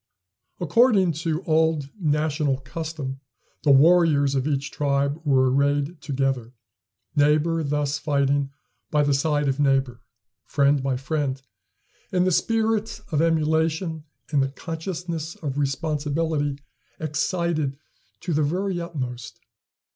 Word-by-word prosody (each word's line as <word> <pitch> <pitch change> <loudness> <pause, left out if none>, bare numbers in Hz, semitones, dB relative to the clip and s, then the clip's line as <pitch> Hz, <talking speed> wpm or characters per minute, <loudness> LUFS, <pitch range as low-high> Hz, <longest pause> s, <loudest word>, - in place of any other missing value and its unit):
According 195 - +4
to 160 +2 -2
old 160 -4 +1
national 150 -3 +1
custom, 145 -2 -5 0.4
the 150 - +1
warriors 145 -1 +5
of 135 +1 0
each 140 -1 -1
tribe 140 +1 0
were 130 -3 +3
arrayed 145 +3 +1
together; 135 -4 -2 0.6
neighbor 150 +3 +3
thus 145 0 -1
fighting 140 -2 +1 0.4
by 150 -1 +2
the 145 0 +2
side 145 +1 +1
of 135 +1 0
neighbor, 135 -4 +1 0.4
friend 140 0 +2
by 130 -1 -1
friend, 135 -1 -2 0.7
and 180 0 +2
the 185 - +2
spirit 220 +4 0
of 150 -1 +2
emulation 160 0 +1 0.3
and 145 -3 +3
the 135 - +1
consciousness 165 +1 -5
of 145 -2 -4
responsibility 145 0 -1 0.4
excited 155 -2 -1 0.4
to 175 - -2
the 155 - +2
very 180 +4 -1
utmost. 125 -8 -6
150 Hz, 115 wpm, -24 LUFS, 140-165 Hz, 0.7 s, warriors